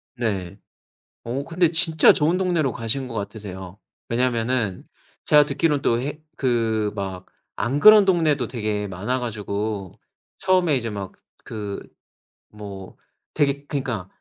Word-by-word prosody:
네. 100 -6 -3 0.7
어 130 +4 -3
근데 170 0 +2
진짜 160 -2 +5
좋은 160 +4 +2
동네로 175 -7 +1
가신 125 +3 -2
것 120 - -8
같으세요. 100 -3 -6 0.3
왜냐하면은 115 -4 0 0.4
제가 150 -1 +6
듣기로는 145 0 +1
또 115 0 +2
해 145 +3 -4 0.2
그 115 -4 +1
막 95 -2 -5 0.3
안 135 +4 -1
그런 215 +3 +9
동네도 160 -9 +2
되게 105 -4 -2
많아 105 +8 -2
가지고 105 -4 -4 0.5
처음에 185 -5 +3
이제 115 -3 -2
막 100 -3 -5 0.3
그 105 -3 -5 0.8
뭐 100 -3 -9 0.4
되게 140 0 0
그러니까 130 -10 -3
120 Hz, 255 characters per minute, -23 LUFS, 105-145 Hz, 0.8 s, 그런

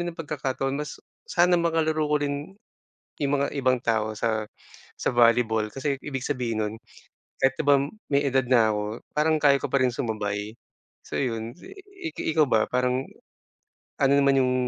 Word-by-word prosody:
rin - - -3
ng 165 - -8
pagkakataon 135 -2 -2
mas - - -9 0.3
sana 175 0 +4
makalaro 160 -2 +1
ko 150 0 +2
rin 145 +4 -3 0.7
yung 140 - +1
mga 140 - +1
ibang 130 -2 +2
tao 110 -1 +1
sa 110 0 0 0.6
sa - - +1
volleyball. 115 -2 +4
Kasi 135 +1 -2
ibig 135 -3 -4
sabihin 120 -6 -2
nun 105 +1 -3 0.7
kahit 135 0 +4
'di - - +1
ba 140 -1 +7 0.3
may 140 +1 +3
edad 130 -1 +2
na 110 -4 +4
ako 105 - -1 0.3
parang 155 +1 +3
kaya 140 -2 +5
ko - - -1
pa 140 - +3
rin 125 -2 +1
sumabay. 105 -2 -3 0.5
So - - -4
yun 115 -2 -3
i 390 -3 -9
i - - -2
ikaw 155 -2 +5
ba? 110 - +3
Parang, 125 +1 0 1.0
ano 135 0 +4
naman 140 0 +4
yung 125 0 +2
135 Hz, 170 wpm, -25 LUFS, 115-150 Hz, 1.0 s, ba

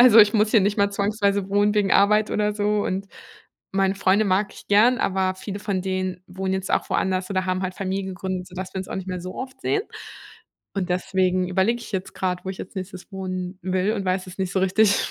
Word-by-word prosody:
Also, 240 -2 +8
ich 210 0 +7
muss 215 0 +3
hier 220 - +5
nicht 200 +2 +1
mal 200 -1 +3
zwangsweise 200 -1 0
wohnen 205 +1 +2
wegen 205 -2 +2
Arbeit 210 +1 +4
oder 210 0 +1
so 210 0 +1
und 195 +1 -2 0.7
meine 195 0 +2
Freunde 195 +2 +3
mag 195 +1 +1
ich - - -14
gern, 230 +5 +5
aber 185 -1 +1
viele 200 +1 -6
von 200 -3 -2
denen 185 -1 -2
wohnen 190 +1 -3
jetzt 190 0 -3
auch - - +1
woanders 185 0 0
oder 185 -1 0
haben 185 0 0
halt 185 0 -3
Familien 190 0 -3
gegründet, 185 0 -4
sodass 185 +1 -7
wir 190 - -2
uns 185 - -5
auch - - -5
nicht 190 0 -5
mehr 185 -1 -3
so 185 +1 -7
oft 260 0 -7
sehen. 415 - 0 0.9
Und 190 -2 -2
deswegen 185 0 +1
überlege 195 +6 +1
ich 230 - -10
jetzt 190 -1 -3
grad, 180 -1 -2
wo 190 - -3
ich 190 - -7
als 185 - -9
nächstes 185 0 -7
wohnen 185 -1 -4
will 185 +3 +1
und 200 -3 -3
weiß 185 0 0
es 185 +1 -11
nicht 190 -1 -2
so 190 - +1
richtig. 200 +2 +3
190 Hz, 230 wpm, -24 LUFS, 185-205 Hz, 0.9 s, Also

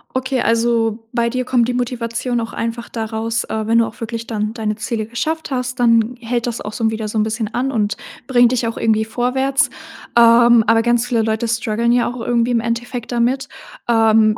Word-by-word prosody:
Okay, 260 -1 0
also 230 -1 +1
bei 235 0 +1
dir 255 0 -1
kommt 245 -2 +2
die 250 - -1
Motivation 245 0 -2
auch 230 0 -5
einfach 230 +1 -4
daraus, 225 0 -3
äh, 220 -1 -3
wenn 230 +1 +3
du 230 - +2
auch - - -12
wirklich 230 0 -5
dann 215 -1 -2
deine 215 -2 -2
Ziele 215 0 -3
geschafft 315 +8 -3
hast, 250 -1 -3
dann 230 0 +3
hält 235 +1 -2
das 235 -1 -3
auch 210 - -5
so 230 - -4
'n 220 - +3
wieder 220 0 -4
so'n 215 0 0
bisschen 220 0 -3
an 265 +2 0
und 210 -3 -1 0.3
bringt 245 -2 +4
dich 240 -2 0
auch 225 - -4
irgendwie 220 -1 +1
vorwärts. 265 +4 0 0.4
Ähm, 235 0 +6
aber 225 0 +4
ganz 240 0 +1
viele 230 -3 +1
Leute 220 +1 -1
struggeln 230 0 0
ja 245 0 +3
auch 245 -1 -5
irgendwie 240 0 +1
im 235 - +2
Endeffekt 235 +1 -4
damit. 245 +3 0 0.4
Ähm, 220 -1 +4
230 Hz, 205 wpm, -18 LUFS, 225-245 Hz, 0.4 s, Ähm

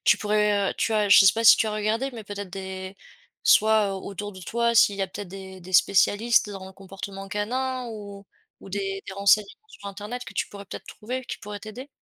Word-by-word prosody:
tu - - +5
pourrais 210 -1 +1
heu, - - -6
tu 225 - 0
as 210 -1 +2
je 200 - +8
sais 190 - +7
pas 230 0 -2
si - - +9
tu 220 - +1
as - - -3
regardé, 220 +5 -1
mais 225 -3 -9
peut-être 205 -2 -7
des 190 0 -7 0.5
soit 215 -2 +4
au 190 - -7
autour 205 +1 -6
de 185 - -11
toi 235 +5 0
s'il 205 -3 +5
y 195 - -1
a - - 0
peut-être 190 0 -8
des 190 0 -10
des 185 +2 -12
spécialistes 205 +5 +3
dans 195 -2 -8
le 190 - -12
comportement 195 0 -9
canin? 255 +5 -2
Ou 200 -2 -9 0.3
ou - - -12
des 195 0 -3
des - - -6
renseignements 200 - +1
sur 200 - -12
Internet 210 +5 -7
que - - -10
tu - - -1
pourrais 200 0 -10
peut-être - - -9
trouver, 255 +4 -6
qui - - -6
pourraient 205 -1 -8
t'aider? 240 +6 -9
205 Hz, 230 wpm, -25 LUFS, 195-220 Hz, 0.5 s, si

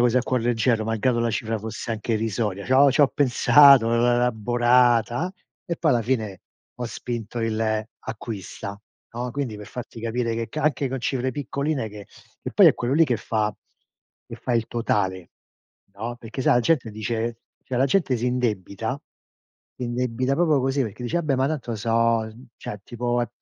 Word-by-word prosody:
così 120 0 +3
a - - 0
cuor 130 -1 0
leggero, 115 -1 +1
malgrado 115 +2 0
la 115 0 +1
cifra 110 +1 -2
fosse 110 +2 -6
anche 110 +1 -3
irrisoria. 105 -2 -2
C'ho 135 +2 +6
c'ho 140 +1 +4
pensato, 140 -2 +6
l'ho 115 - +2 0.2
elaborata, 120 - +2 0.3
e 170 - -3
poi 160 - +2
alla 120 -2 +2
fine 110 -6 -2 0.3
ho 125 - -4
spinto 120 0 -5
il 115 -1 -1 0.4
acquista, 105 -2 -7 0.4
no; 125 +1 -3
quindi 135 -6 -3
per 105 -1 -10
farti 120 0 -8
capire 115 0 -1
che 115 0 -3
ca 155 - -4
anche 145 -2 +1
con 135 0 -3
cifre 130 +1 -1
piccoline 140 -2 -2
che 105 -1 -11 0.4
e - - -4
poi - - +7
è - - +7
quello 120 +1 -2
lì 165 +2 +6
che 120 - +1
fa 110 -1 -1 0.8
che - - -9
fa 125 - -3
il 115 -1 +1
totale, 95 -6 -1 0.6
no; 115 +4 -5
perché 120 +2 -6
sa - - +4
la 120 - +4
gente 125 -3 +1
dice 115 +2 -3 0.3
cioè 130 - -4
la 135 - +4
gente 140 -2 +1
si 120 +2 -2
indebita, 115 0 -2 0.8
indebita 125 +1 -1
proprio 155 -3 +3
così 135 +1 +1
perché 115 0 -6
dice: 140 +8 -1
"Vabbè, 155 -5 0
ma 130 +1 +2
tanto 130 -6 -3
so 115 +2 -2
uhm, 115 +1 0
cioè 105 - -6
tipo 120 0 -1
è 120 - -3
120 Hz, 180 wpm, -24 LUFS, 110-130 Hz, 0.8 s, poi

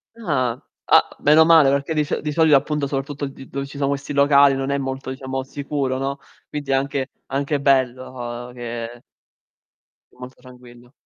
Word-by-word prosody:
Ah! 130 - -1 0.3
A - - +7
meno 155 +2 +5
male 160 -4 +6
perché 140 +3 0
di 155 -1 +1
so 145 - -2
di 150 -1 -4
solito, 155 -2 +5
appunto, 150 +1 -2
soprattutto 140 +1 -3
d 135 0 -11
dove 140 0 -4
ci 140 +1 -11
sono 140 -1 0
questi 140 0 -3
locali 140 -1 +5
non 135 0 -3
è 140 - +1
molto, 135 -1 -4
diciamo, 130 0 -4
sicuro, 140 -1 -3
no, 135 +1 -3 0.3
quindi 145 -2 -4
è - - +3
anche 135 0 -1 0.2
anche 140 +1 -1
bello 125 -2 -1
che 120 -1 -6 1.1
è - - -25
molto 125 +1 -11
tranquillo. 125 -1 -16
135 Hz, 175 wpm, -21 LUFS, 130-145 Hz, 1.1 s, A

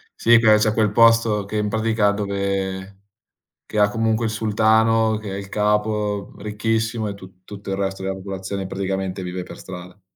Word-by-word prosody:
Sì, 115 0 +5
che 110 -2 +6
c'è 110 0 +2
quel 110 -2 +2
posto 115 -2 +4
che 105 +1 -4
in 105 0 0
pratica, 110 -1 +1
dove 100 -1 -3 0.7
che 105 - -4
ha 105 0 +5
comunque 110 +1 0
il 110 - -1
sultano, 110 0 +2
che 105 -2 -7
è - - -4
il 100 -1 -7
capo, 105 -1 0
uhm, - - -13
ricchissimo 110 +1 -1
e 100 - -5
tu 95 -1 -15
tutto 100 -1 -9
il 95 - -1
resto 95 -1 -3
della 95 0 -2
popolazione 95 0 -5
praticamente 95 0 -3
vive 90 0 -4
per - - -10
strada. 90 +1 -10
105 Hz, 185 wpm, -21 LUFS, 95-110 Hz, 0.7 s, che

